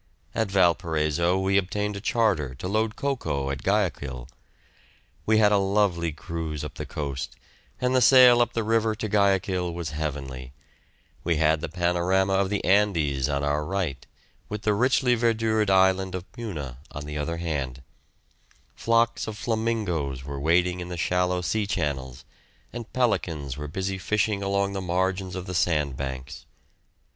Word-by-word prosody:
At 110 Hz, -3 st, 0 dB
Valparaiso 85 Hz, -2 st, +2 dB
we 95 Hz, +1 st, +3 dB
obtained 105 Hz, +2 st, -2 dB
a 100 Hz, -, -6 dB
charter 95 Hz, -, +1 dB
to 80 Hz, -, -6 dB
load 110 Hz, +2 st, 0 dB
cocoa 95 Hz, -, -2 dB
at 70 Hz, -, -4 dB
Guayaquil. 80 Hz, -, -1 dB, 1.0 s
We 110 Hz, 0 st, +4 dB
had 105 Hz, -1 st, +5 dB
a 100 Hz, -, +4 dB
lovely 95 Hz, -4 st, +1 dB
cruise 80 Hz, -1 st, -5 dB
up -, -, -6 dB
the -, -, -7 dB
coast, 70 Hz, -3 st, -4 dB, 0.4 s
and 125 Hz, +1 st, +1 dB
the 130 Hz, -, +4 dB
sail 125 Hz, 0 st, +8 dB
up 120 Hz, 0 st, +1 dB
the 115 Hz, -, -1 dB
river 110 Hz, 0 st, +1 dB
to 110 Hz, -, -4 dB
Guayaquil 95 Hz, -3 st, +1 dB
was 85 Hz, -3 st, -5 dB
heavenly; 70 Hz, -4 st, -5 dB, 0.7 s
we 85 Hz, -1 st, +1 dB
had 80 Hz, 0 st, +2 dB
the 85 Hz, -, -4 dB
panorama 90 Hz, +3 st, +1 dB
of 95 Hz, 0 st, +2 dB
the 105 Hz, 0 st, -2 dB
Andes 85 Hz, -9 st, +2 dB
on 70 Hz, 0 st, -1 dB
our 75 Hz, +1 st, 0 dB
right, 85 Hz, -5 st, -2 dB, 0.5 s
with 105 Hz, 0 st, -5 dB
the 105 Hz, -, +2 dB
richly 125 Hz, +3 st, +3 dB
verdured 115 Hz, -2 st, +1 dB
island 95 Hz, 0 st, +3 dB
of 90 Hz, -1 st, -5 dB
Puna 80 Hz, -, -6 dB
on 75 Hz, -, -7 dB
the 75 Hz, 0 st, -5 dB
other 85 Hz, +3 st, -2 dB
hand; 70 Hz, -6 st, -3 dB, 0.9 s
flocks 115 Hz, 0 st, +1 dB
of 110 Hz, -1 st, -5 dB
flamingoes 105 Hz, -, -1 dB
were 70 Hz, 0 st, -6 dB
wading 90 Hz, +4 st, +2 dB
in 90 Hz, 0 st, -6 dB
the 90 Hz, -, -5 dB
shallow 90 Hz, +1 st, +1 dB
sea 105 Hz, +4 st, -1 dB
channels, 70 Hz, -, -3 dB, 0.5 s
and 120 Hz, -2 st, -7 dB
pelicans 80 Hz, -, -1 dB
were 75 Hz, +1 st, -6 dB
busy 95 Hz, +4 st, -3 dB
fishing 105 Hz, +1 st, 0 dB
along 100 Hz, 0 st, 0 dB
the 95 Hz, -, -3 dB
margins 95 Hz, +1 st, -1 dB
of 90 Hz, -1 st, -5 dB
the 90 Hz, -, -5 dB
sandbanks. 70 Hz, -6 st, -2 dB
90 Hz, 155 wpm, -26 LUFS, 75-105 Hz, 1.0 s, sail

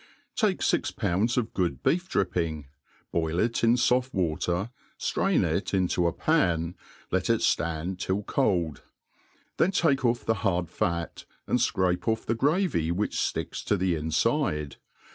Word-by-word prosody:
TAKE -, -, +1 dB
fi^ -, -, +1 dB
poundf 105 Hz, +8 st, 0 dB
of 115 Hz, -3 st, -1 dB
good 90 Hz, -3 st, -1 dB
beef 180 Hz, +3 st, +1 dB
dripping, 85 Hz, -5 st, -1 dB, 0.5 s
boil 80 Hz, 0 st, -1 dB
it 115 Hz, +5 st, 0 dB
in 115 Hz, +1 st, +5 dB
Ibft 125 Hz, +1 st, +2 dB
wa 85 Hz, -5 st, +1 dB
^ -, -, -13 dB
ter, 90 Hz, +6 st, -1 dB, 0.3 s
ftrain -, -, +1 dB
it -, -, -1 dB
into 90 Hz, -2 st, +1 dB
a -, -, +1 dB
pan, 85 Hz, -, +1 dB, 0.4 s
let -, -, 0 dB
it -, -, +3 dB
ftand 85 Hz, +3 st, 0 dB
till 95 Hz, +3 st, -1 dB
cold} 90 Hz, -, 0 dB, 0.8 s
then 170 Hz, -, +3 dB
take 155 Hz, -8 st, +2 dB
off 120 Hz, -1 st, +1 dB
the 115 Hz, -, +3 dB
hard 90 Hz, -5 st, 0 dB
fat, 85 Hz, -2 st, -2 dB, 0.2 s
and -, -, +1 dB
fcrape 90 Hz, 0 st, +1 dB
off 110 Hz, 0 st, 0 dB
the 115 Hz, -, +1 dB
gfavy 140 Hz, -, +1 dB
which 100 Hz, +5 st, -1 dB
fticks -, -, -2 dB
to 100 Hz, -, +2 dB
the 90 Hz, -1 st, +1 dB
infide. 75 Hz, -1 st, 0 dB
95 Hz, 160 wpm, -27 LUFS, 85-115 Hz, 0.8 s, in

